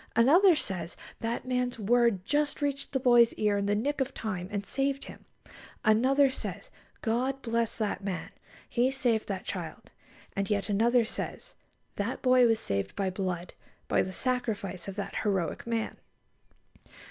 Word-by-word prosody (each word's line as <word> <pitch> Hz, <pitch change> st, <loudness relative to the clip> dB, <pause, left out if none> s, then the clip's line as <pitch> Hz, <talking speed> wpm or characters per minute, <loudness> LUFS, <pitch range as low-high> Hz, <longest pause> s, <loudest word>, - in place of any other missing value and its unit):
Another 330 Hz, -, +6 dB
says: 180 Hz, -, -3 dB, 0.2 s
"That 230 Hz, +2 st, -3 dB
man's 250 Hz, -1 st, -1 dB
word 230 Hz, -3 st, +2 dB
just 295 Hz, +3 st, +1 dB
reached 285 Hz, -1 st, -2 dB
the 265 Hz, -, 0 dB
boy's 240 Hz, -2 st, +5 dB
ear 210 Hz, -1 st, +1 dB
in 200 Hz, -, -1 dB
the 205 Hz, -, +2 dB
nick 280 Hz, +7 st, -1 dB
of 265 Hz, 0 st, -2 dB
time, 185 Hz, -4 st, -4 dB
and 205 Hz, -1 st, -3 dB
saved 275 Hz, +3 st, -1 dB
him." -, -, -12 dB, 0.6 s
Another 260 Hz, +6 st, +4 dB
says: 200 Hz, -6 st, -5 dB, 0.3 s
"God 255 Hz, +4 st, 0 dB
bless 230 Hz, -1 st, 0 dB
that 210 Hz, -2 st, -2 dB
man! 190 Hz, -2 st, -4 dB, 0.4 s
He 245 Hz, +1 st, +2 dB
saved 245 Hz, -5 st, 0 dB
that 195 Hz, -2 st, -4 dB
child." -, -, -6 dB, 0.4 s
And 195 Hz, 0 st, -1 dB
yet 200 Hz, -1 st, 0 dB
another 230 Hz, +3 st, +3 dB
says: -, -, -5 dB, 0.4 s
"That 205 Hz, +5 st, -3 dB
boy 255 Hz, -1 st, +6 dB
was 225 Hz, -1 st, +2 dB
saved 100 Hz, -, -2 dB
by 195 Hz, -2 st, -1 dB
blood; 180 Hz, -2 st, -3 dB, 0.3 s
by -, -, +3 dB
the 185 Hz, -, -3 dB
sacrifice 205 Hz, -6 st, -2 dB
of 195 Hz, -, -5 dB
that 205 Hz, -, -4 dB
heroic 195 Hz, 0 st, -1 dB
man!" 230 Hz, -1 st, -2 dB
230 Hz, 160 wpm, -29 LUFS, 200-255 Hz, 0.6 s, Another